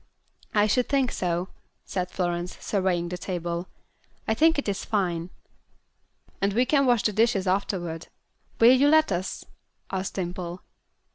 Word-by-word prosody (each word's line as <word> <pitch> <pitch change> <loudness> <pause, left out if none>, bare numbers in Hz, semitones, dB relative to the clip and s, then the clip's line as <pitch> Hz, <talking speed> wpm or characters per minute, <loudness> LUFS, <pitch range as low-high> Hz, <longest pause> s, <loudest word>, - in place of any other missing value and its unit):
"I 205 0 +5
should 245 +4 +1
think 270 -3 +2
so," 175 0 -2 0.4
said 180 -1 -3
Florence, 175 -1 -2
surveying 185 -4 0
the 180 0 -5
table. 175 -1 -3 0.6
"I 220 - +3
think 320 +7 +4
it 285 - -2
is 200 -1 -2
fine." 175 -5 -1 1.1
"And 200 0 +1
we 245 +4 +3
can 275 0 +3
wash 240 -3 +3
the 215 - +1
dishes 215 -2 +2
afterward. 180 -3 -1 0.5
Will 235 +2 +8
you 275 +3 +4
let 315 -4 +5
us?" 185 +1 -3 0.5
asked 190 0 -3
Dimple. 180 -1 -4
190 Hz, 145 wpm, -26 LUFS, 175-230 Hz, 1.1 s, Will